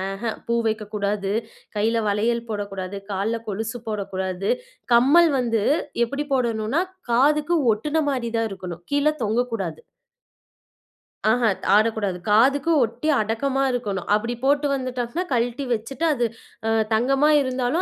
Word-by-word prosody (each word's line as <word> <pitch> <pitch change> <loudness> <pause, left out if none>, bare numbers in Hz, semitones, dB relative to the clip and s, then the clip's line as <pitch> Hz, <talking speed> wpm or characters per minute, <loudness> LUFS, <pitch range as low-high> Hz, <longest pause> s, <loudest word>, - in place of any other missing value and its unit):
அஹ்ஹ. 225 +2 -3 0.2
பூ 235 - +1
வைக்கக்கூடாது, 210 -2 -2 0.5
கையில 225 +2 +2
வளையல் 230 +3 0
போடக்கூடாது, 200 -2 -4
கால்ல 205 +4 -1
கொலுசு 220 +4 -4
போடக்கூடாது. 190 -2 -3 0.4
கம்மல் 290 +8 +6
வந்து 230 -4 0 0.4
எப்படி 280 +5 -4
போடணும்னா, 235 +3 +1 0.3
காதுக்கு 295 +7 +3 0.2
ஒட்டுன 300 +8 -1
மாரி 240 -4 -2
தான் 225 -1 0
இருக்கணும், 180 -3 -7
கீழ 285 +1 +1 0.2
தொங்கக்கூடாது. 220 -7 -1 1.5
ஆஹான். 225 -5 +2 0.2
ஆடக்கூடாது. 215 -3 +1
காதுக்கு 270 +9 +4
ஒட்டி 235 +7 -2
அடக்கமா 230 +6 0
இருக்கணும். 205 -7 -3
அப்படி 230 +3 +1
போட்டு 285 +1 +3
வந்துட்டோம்னா, 255 +4 -3
கழட்டி 245 +3 0
வச்சுட்டு, 235 +7 -4
அது 240 -4 0 0.4
அ - - +2 0.2
தங்கமா 270 +6 +3
இருந்தாலும் 260 +5 0
230 Hz, 120 wpm, -23 LUFS, 210-265 Hz, 1.5 s, கம்மல்